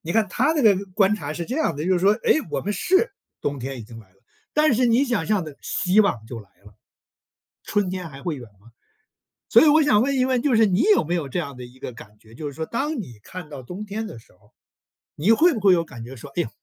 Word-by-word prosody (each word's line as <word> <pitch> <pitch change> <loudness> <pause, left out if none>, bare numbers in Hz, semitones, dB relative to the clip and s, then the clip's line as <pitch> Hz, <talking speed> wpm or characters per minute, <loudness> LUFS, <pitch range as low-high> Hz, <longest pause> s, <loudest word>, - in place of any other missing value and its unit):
你 165 - -7
看 220 -2 +3
他 280 - +1
这 295 - +1
个 210 -3 +6 0.2
观 205 0 +4
察 145 -7 -5
是 170 - -4
这 250 - -4
样 315 - +1
儿 - - -10
的， 150 - -3
就 190 - +2
是 180 - +3
说， 195 +3 +5
诶， - - +4
我 - - -1
们 205 - -2
是 380 - +1 0.3
冬 145 -1 -2
天 130 +1 -5
已 - - -7
经 115 +1 -12
来 105 - -20
了， 95 - -33 0.4
但 300 -4 +3
是 250 +2 +2
你 240 +4 +3
想 230 -11 -1
象 210 -5 +1
的 150 -3 -10
希 190 +3 +2
望 115 - 0
就 115 -1 -7
来 100 - -18
了。 105 -1 -16 0.9
春 205 -3 0
天 180 -3 -5
还 135 -1 -12
会 170 -5 -3
远 120 -4 -10
吗？ 115 - -19 0.8
所 - - +7
以 315 - +6
我 310 +1 +6
想 215 -7 +4
问 275 +1 0
一 255 - +3
问， 255 -2 +1
就 275 -5 +2
是 220 -1 +5
你 195 +5 +2
有 420 - +4
没 170 +3 -2
有 155 -6 -2
这 180 - -3
样 140 -6 -4
的 125 - -8
一 125 +2 -14
个 125 - -6
感 105 -2 -14
觉？ 110 +1 -19
就 150 +3 -7
是 145 - -5
说 160 +2 -5
当 290 +6 -2
你 120 - -10
看 180 -4 -9
到 140 -3 -8
冬 180 +11 -7
天 215 +2 -4
的 120 - -9
时 - - -21
候， 100 +3 -28 0.6
你 185 +10 +2
会 325 +8 +5
不 225 - -3
会 195 -2 +5
有 170 -1 +2
感 120 -7 -10
觉 130 +3 -9
说， 140 +4 -11
哎 175 - +2
呀， - - -7
180 Hz, 305 characters per minute, -23 LUFS, 135-225 Hz, 0.9 s, 所